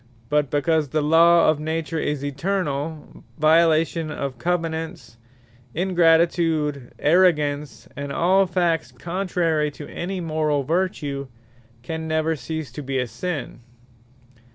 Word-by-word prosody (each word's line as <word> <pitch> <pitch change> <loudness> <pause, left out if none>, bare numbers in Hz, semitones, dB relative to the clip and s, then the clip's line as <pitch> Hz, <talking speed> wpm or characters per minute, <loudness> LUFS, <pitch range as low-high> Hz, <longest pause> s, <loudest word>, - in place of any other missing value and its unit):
But 150 -2 +1
because 150 0 +1
the 155 +2 0
Law 165 +2 +5
of 155 -1 +3
Nature 160 +1 -2
is 145 -2 -2
eternall, 150 -1 -3
Violation 160 +1 +3
of 140 -4 -5
Covenants, 160 -8 -3 0.6
Ingratitude, 165 -5 +2
Arrogance, 150 -4 +2
and 140 +1 -5
all 185 +6 +3
Facts 170 -2 0
contrary 170 -4 -1
to 145 0 -10
any 185 +2 -4
Morall 155 -3 0
vertue, 145 -4 -1 0.6
can 160 +4 -5
never 160 0 0
cease 155 0 -5
to 140 - -7
be 135 -1 -4
Sinne. 145 -1 -5
160 Hz, 110 wpm, -23 LUFS, 145-170 Hz, 0.6 s, Law